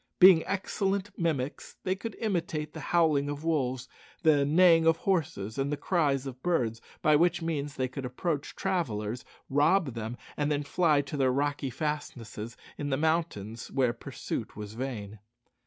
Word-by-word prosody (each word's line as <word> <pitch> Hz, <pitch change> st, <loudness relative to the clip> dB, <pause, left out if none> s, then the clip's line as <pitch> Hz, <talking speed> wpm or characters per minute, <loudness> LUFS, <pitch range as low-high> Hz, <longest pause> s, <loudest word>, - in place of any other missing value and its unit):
Being 180 Hz, -3 st, +8 dB
excellent 200 Hz, 0 st, -1 dB
mimics, 150 Hz, -5 st, -2 dB
they 185 Hz, -, +1 dB
could 200 Hz, +3 st, -6 dB
imitate 170 Hz, -7 st, -2 dB
the 160 Hz, -, -7 dB
howling 150 Hz, -3 st, +2 dB
of 145 Hz, +1 st, -5 dB
wolves, 130 Hz, -6 st, 0 dB, 0.4 s
the 150 Hz, -3 st, +5 dB
neighing 165 Hz, +1 st, +6 dB
of 165 Hz, 0 st, +5 dB
horses, 160 Hz, -, -1 dB
and 135 Hz, +1 st, 0 dB
the 145 Hz, -, -1 dB
cries 145 Hz, -4 st, +1 dB
of 130 Hz, -1 st, -7 dB
birds, 120 Hz, -10 st, 0 dB, 0.2 s
by 150 Hz, -, +5 dB
which 175 Hz, +2 st, +3 dB
means 145 Hz, -3 st, -2 dB
they 130 Hz, -, 0 dB
could 135 Hz, +2 st, -6 dB
approach 140 Hz, +4 st, -3 dB
travellers, 120 Hz, -, -2 dB, 0.2 s
rob 145 Hz, +1 st, +3 dB
them, 115 Hz, +1 st, -5 dB, 0.2 s
and 150 Hz, 0 st, 0 dB
then 145 Hz, 0 st, 0 dB
fly 150 Hz, 0 st, +3 dB
to 145 Hz, +1 st, -6 dB
their 135 Hz, -2 st, +3 dB
rocky 145 Hz, +1 st, 0 dB
fastnesses 120 Hz, -6 st, -4 dB, 0.2 s
in 145 Hz, -, -2 dB
the 135 Hz, -, +1 dB
mountains, 150 Hz, -9 st, -1 dB
where 130 Hz, -3 st, +1 dB
pursuit 120 Hz, -, -5 dB
was 105 Hz, 0 st, -7 dB
vain. 110 Hz, -4 st, -5 dB
145 Hz, 160 wpm, -29 LUFS, 130-165 Hz, 0.4 s, Being